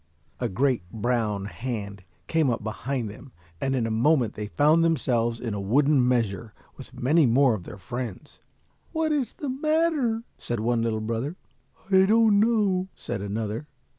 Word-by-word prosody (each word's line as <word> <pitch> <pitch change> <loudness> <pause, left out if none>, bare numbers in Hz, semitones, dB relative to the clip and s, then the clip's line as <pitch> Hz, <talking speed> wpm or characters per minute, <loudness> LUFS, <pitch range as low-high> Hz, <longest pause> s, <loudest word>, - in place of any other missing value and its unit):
A 120 - -1
great 125 +3 +1
brown 110 -3 -1
hand 100 -4 -5 0.2
came 160 -4 +2
up 115 -2 -1
behind 115 +3 -3
them 110 +6 -11 0.3
and 135 0 0
in 120 -3 0
a 115 - -2
moment 120 0 +2
they 105 0 -5
found 155 +8 +3
themselves 120 -7 +1
in 115 -4 -3
a 100 - -3
wooden 135 +5 +3
measure 115 -4 -1 0.2
with - - -12
many 150 +3 +4
more 130 +1 +4
of 95 -6 -5
their - - -9
friends. 120 - -7 0.5
"What 320 -1 0
is 275 -6 0
the 290 - -5
matter?" 295 -4 +1 0.2
said 120 -2 -3
one 115 +1 +1
little 110 -1 -1
brother. 115 +8 -3 0.6
"I 190 0 +6
don't 220 -1 +5
know," 205 -4 +2
said 95 - -5
another. 110 +6 -3
125 Hz, 165 wpm, -26 LUFS, 110-165 Hz, 0.6 s, I